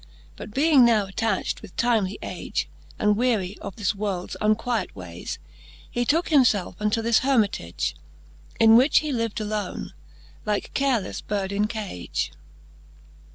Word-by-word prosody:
But 210 - -9
being 280 +2 +5
now 225 -4 +4
attacht 200 +1 -1
with 210 -5 -13
timely 220 -5 +1
age, - - -3 0.3
And 210 0 +3
weary 215 -5 0
of 195 - -7
this 210 -1 0
worlds 195 -3 -3
unquiet 220 +2 0
waies, 90 -2 -7 0.5
He 240 0 0
tooke 325 +7 +2
him 295 -4 +6
felfe 205 -6 +1
unto 210 +2 0
this 230 -1 +4
Hermitage, 200 - 0 0.6
In 225 0 +7
which 255 +6 +5
he 305 -1 -3
liv'd 230 -3 -1
alone, 210 -3 -4 0.5
like 210 -1 -2
carelefTe 265 -7 0
bird 200 -2 -1
in 205 +1 +1
cage. 90 - -4
215 Hz, 140 wpm, -25 LUFS, 195-235 Hz, 0.6 s, In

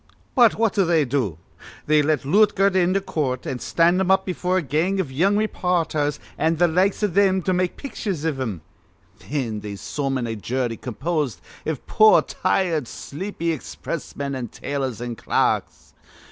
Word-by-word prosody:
"But 240 -5 +5
what 225 -2 +1
do 200 -3 +3
they 165 -4 +3
do? 120 - -1 0.5
They 150 0 +4
get 150 -1 0
Lootgert 200 +3 +3
into 185 +1 +3
coort 150 -9 -2
an' 130 - -3
stand 170 +6 +2
him 190 - 0
up 190 0 +4
befure 185 0 -1
a - - +2
gang 160 +7 0
iv 175 -8 -2
young 185 +10 +2
rayporthers 170 -8 0 0.2
an' 160 +1 +2
th' 175 +2 +4
likes 190 +5 +2
iv 205 -5 +1
thim 190 -1 +3
to 185 - +1
make 180 0 0
pitchers 200 - -4
iv 150 -4 -1
him. 110 -10 -3 0.6
Thin 125 -7 -3
they 105 -1 -6
summon 135 +3 -2
a 115 -1 -3
jury 120 +2 -2
composed 135 - -2 0.3
iv 155 -4 -3
poor, 215 0 +6
tired, 175 -7 0
sleepy 170 - -4
expressmen 145 -2 -5
an' 130 -3 -4
tailors 130 -1 -4
an' 120 -2 -4
clerks. - - -1
160 Hz, 165 wpm, -23 LUFS, 135-185 Hz, 0.6 s, poor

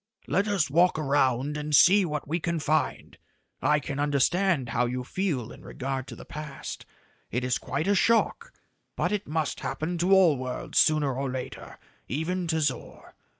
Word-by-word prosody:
"Let 200 +3 +1
us 200 -6 +1
walk 170 +4 +3
around 140 -1 +1
and 150 0 0
see 195 +6 +6
what 150 -4 -4
we 165 +4 -1
can 170 0 -2
find. 155 +1 -1 0.4
I 150 0 +3
can 140 -1 -5
understand 145 +1 +1
how 120 +2 +1
you 125 +1 -3
feel 145 - -2
in - - -12
regard 135 0 -4
to - - -8
the - - -11
past. 150 -2 -8 0.4
It 125 +2 -2
is 125 -1 0
quite 160 - -3
a 205 - +4
shock 230 - +2 0.4
but - - 0
it 205 -1 -2
must 155 -1 -2
happen 170 +2 -3
to 180 +3 +1
all 185 -7 +6
worlds 125 0 -2
sooner 150 -3 +3
or 135 +1 -2
later 130 -1 -7 0.3
even 170 +6 -2
to 160 -1 0
Zor. 145 - -4
150 Hz, 175 wpm, -27 LUFS, 135-175 Hz, 0.4 s, see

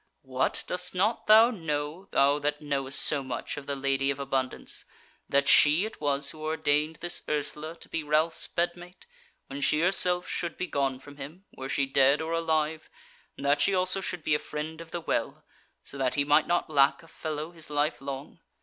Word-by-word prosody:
What! 130 0 -1
dost 180 0 -3
not 215 +6 0
thou 220 +3 +8
know, 160 -1 -4
thou 140 +1 +3
that 150 0 -1
knowest 140 -2 -2
so 145 - +2
much 130 -2 -4
of 145 -1 -8
the 140 - -1
Lady 135 0 0
of 140 - -1
Abundance, 135 -2 -2 0.5
that 140 0 +2
she 155 +7 +6
it 220 - -8
was 140 -1 0
who 155 - -12
ordained 155 0 0
this 175 +1 -2
Ursula 150 +2 -2
to - - -12
be 165 - -3
Ralph's 155 +2 +1
bedmate, 175 +1 -4 0.4
when 140 +1 -7
she 150 - +2
herself 180 0 +3
should 170 -2 -3
be 180 - -2
gone 135 -5 -1
from 145 +2 -14
him, 155 +8 -9
were 130 0 -6
she 140 - +1
dead 135 +1 +4
or 160 +1 -3
alive, 160 -1 0 0.5
and 140 - -6
that 145 +1 +3
she 195 +6 +3
also 185 +1 +2
should 180 -3 -4
be 150 - +1
a 150 - +3
Friend 155 +2 -6
of 165 - -11
the 175 - -4
Well, - - -2 0.4
so 140 - -6
that 130 -2 0
he 145 - +2
might 150 +2 +4
not 175 0 +1
lack 140 0 +3
a - - -16
fellow 155 0 -5
his 165 -3 -7
life 150 0 0
long? 140 +4 -7
150 Hz, 200 wpm, -28 LUFS, 140-165 Hz, 0.5 s, thou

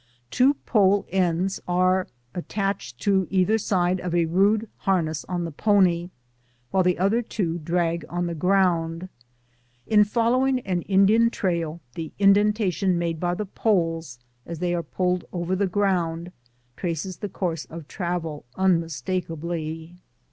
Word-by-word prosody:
Two 270 +3 +4
pole 205 -6 +2
ends 185 0 0
are 185 +1 +2 0.3
attached 195 - -3
to 190 -3 +2
either 195 +4 +2
side 185 -2 +1
of 175 -1 -2
a 170 -1 +3
rude 200 +6 +2
harness 165 -5 0
on 175 -2 -3
the 165 - -5
pony, 180 -1 +2 0.6
while 190 - +3
the 180 -1 +2
other 200 +6 +2
two 175 -7 -2
drag 170 +1 -1
on 175 0 -2
the 170 - -3
ground. 175 -1 +1 0.8
In 210 +4 +5
following 250 +4 +2
an 185 -5 -2
Indian 205 +4 +5
trail, 170 -6 -2
the 160 +1 -6
indenta 205 0 +4
tion 185 0 +1
made 170 -2 -2
by 175 +1 0
the 210 - -3
poles, 165 - -1 0.3
as 170 +4 -7
they 175 +1 -1
are 175 - 0
pulled 180 +2 -1
over 175 +1 -2
the 195 +1 +1
ground, 180 -3 0 0.4
traces 175 +1 -3
the 205 - -5
course 170 -4 -3
of 165 -2 -10
travel 170 -5 -4
unmistakably. 165 -1 -2
180 Hz, 140 wpm, -24 LUFS, 170-195 Hz, 0.8 s, In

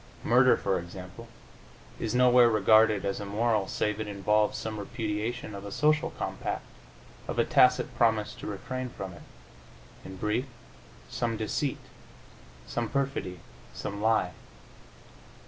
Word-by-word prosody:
Murder, - - +5
for 95 -2 0
example, 90 +6 -10 0.7
is 110 +1 -2
nowhere 125 -1 +6
regarded 110 -1 +4
as 100 - -1
immoral 105 0 0
save 105 0 -1
it 110 - -3
involve 105 +1 +1
some 110 -1 -4
repudiation 110 +2 -3
of 100 0 -7
a 100 - -7
social 150 +7 +2
compact, - - -4 0.6
of - - -4
a - - +3
tacit 125 0 +4
promise 110 -3 +2
to - - -9
refrain 125 +5 -4
from 95 -5 -7
it 85 - -13 0.8
in 95 - -9
brief, 105 +7 -1 0.6
some 115 - -2
deceit, 125 +6 -1 0.9
some 120 -2 -3
perfidy, 135 - -2 0.3
some 100 0 -5
lie. 110 -4 +2
110 Hz, 130 wpm, -28 LUFS, 100-120 Hz, 0.9 s, nowhere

